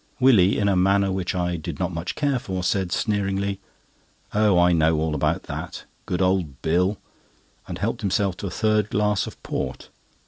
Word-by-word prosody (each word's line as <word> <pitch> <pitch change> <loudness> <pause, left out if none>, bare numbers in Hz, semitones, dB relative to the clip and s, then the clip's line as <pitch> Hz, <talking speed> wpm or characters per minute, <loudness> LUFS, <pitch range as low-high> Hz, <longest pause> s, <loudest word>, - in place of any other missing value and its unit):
Willie, 110 -8 +5
in 100 - +1
a 100 - +3
manner 95 +1 +3
which 95 -1 -2
I 90 -1 -1
did 80 - -6
not 90 -1 -2
much 85 +2 -4
care 140 -3 0
for, 95 -5 -4
said 90 -1 0
sneeringly: 100 -1 -1 0.7
"Oh, 105 -3 +3
I 90 0 +5
know 80 -1 +3
all 80 0 -1
about 75 - 0
that—Good 90 +1 -5
old 90 -8 0
Bill!" 90 +5 +1 0.7
and - - -5
helped - - -2
himself 100 -1 0
to 100 - -4
a - - -3
third 110 +2 +1
glass 105 -1 +1
of - - -9
port. - - -4
95 Hz, 175 wpm, -24 LUFS, 90-100 Hz, 0.7 s, Willie